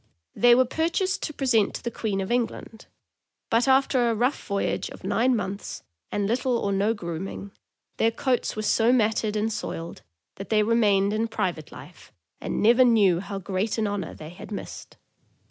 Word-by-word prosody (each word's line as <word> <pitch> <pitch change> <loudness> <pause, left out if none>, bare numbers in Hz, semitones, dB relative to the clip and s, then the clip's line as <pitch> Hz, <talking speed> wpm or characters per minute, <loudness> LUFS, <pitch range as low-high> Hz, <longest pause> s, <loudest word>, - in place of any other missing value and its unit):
They 240 0 +6
were 255 +1 +4
purchased 340 +7 -1
to 305 - -4
present 245 -7 +1
to - - -7
the 235 - -3
Queen 205 -4 -2
of 190 - -4
England; 235 -2 -3 0.6
but 230 +3 +3
after 265 -2 +3
a 230 - 0
rough 245 +6 -1
voyage 200 0 -1
of - - -12
nine 250 +2 +2
months, 200 -2 -5 0.3
and 205 - -1
little 245 +3 0
or 200 - -1
no 200 +3 +1
grooming, 190 +2 -6 0.5
their 225 - +3
coats 250 +2 -1
were 215 - -3
so 225 +2 +3
matted 220 -3 +1
and 215 +1 0
soiled 170 -5 -6 0.4
that 195 - -8
they 215 -1 +3
remained 210 -3 +2
in 220 +1 0
private 175 -8 -3
life, - - -13 0.3
and - - -3
never 240 +4 +6
knew 205 -8 +4
how 200 +1 -6
great 195 +4 -2
an 220 - 0
honor 205 -1 -3
they 155 - -9
had 180 - -11
missed! 205 - -8
220 Hz, 180 wpm, -25 LUFS, 200-240 Hz, 0.6 s, They